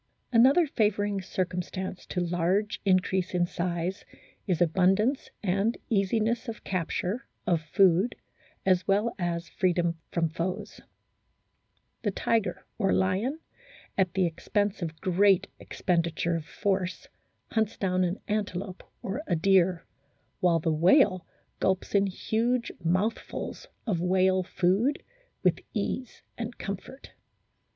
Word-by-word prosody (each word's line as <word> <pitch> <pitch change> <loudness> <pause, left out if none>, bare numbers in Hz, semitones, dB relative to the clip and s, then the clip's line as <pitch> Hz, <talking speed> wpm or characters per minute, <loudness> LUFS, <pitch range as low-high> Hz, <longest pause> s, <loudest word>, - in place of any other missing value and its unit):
Another 265 +9 +6
favouring 205 -6 0
circumstance 185 0 -4
to 180 - -2
large 175 +4 0
increase 185 -1 +2
in 175 -1 +3
size 175 +2 -2 0.4
is 180 -4 +1
abundance, 190 - +2
and 200 +4 +1
easiness 220 +4 +1
of 225 -1 -6
capture, 185 - -2 0.2
of 170 -3 +2
food, 185 +6 +3 0.5
as 185 -1 +3
well 210 +4 +2
as 170 -1 -2
freedom 170 -2 0
from 170 -1 +1
foes. 170 +3 -4 1.2
The - - 0
tiger 225 -3 0
or 195 -3 +2
lion, 200 - +1 0.5
at 190 -2 +1
the 190 -1 +3
expense 205 +4 -1
of 160 -2 -4
great 190 +1 +4
expendi 170 -3 -1
ture 170 0 0
of 165 -2 -4
force, 190 +2 -2 0.4
hunts 220 -1 0
down 185 -1 +1
an 180 +2 -1
antelope 195 -3 -3 0.2
or 195 +9 -3
a - - +2
deer, 185 0 +3 0.5
while 170 -2 +3
the 160 0 0
whale 185 - +4 0.3
gulps 190 -1 0
in 200 -1 +4
huge 230 +5 0
mouthfuls 185 +7 -2 0.2
of 185 -7 0
"whale 185 +1 +3
food' 190 +10 +1 0.4
with - - +3 0.2
ease 255 -3 -3 0.2
and 230 +1 -5
comfort. 200 +7 -7
190 Hz, 120 wpm, -28 LUFS, 175-210 Hz, 1.2 s, Another